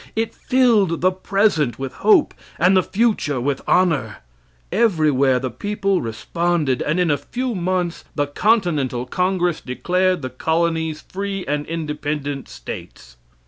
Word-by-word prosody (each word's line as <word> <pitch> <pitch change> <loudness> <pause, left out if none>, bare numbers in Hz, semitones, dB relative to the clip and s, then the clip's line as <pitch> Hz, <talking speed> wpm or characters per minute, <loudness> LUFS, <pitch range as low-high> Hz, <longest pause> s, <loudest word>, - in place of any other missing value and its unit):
It 225 0 -1
filled 230 -10 +2
the 185 +1 +4
present 185 - +1
with 135 -1 -5
hope 395 -8 +4 0.2
and 180 +3 +4
the 185 - +5
future 200 - 0
with 135 +2 -1
honor. 150 - +2 0.6
Everywhere 155 - +3
the 130 0 -3
people 195 - -1
responded, 150 +4 -1
and 155 +4 0
in 175 -3 +2
a 145 - +1
few 255 0 -3
months 180 -2 -2
the 145 - +1
Continental 150 - +1
Congress 180 +3 0
declared 180 +5 0
the 130 - -4
colonies 160 +2 -1
free 195 0 -4
and 150 0 -2
independent 150 -3 -4
states. - - -9
170 Hz, 135 wpm, -21 LUFS, 145-190 Hz, 0.6 s, the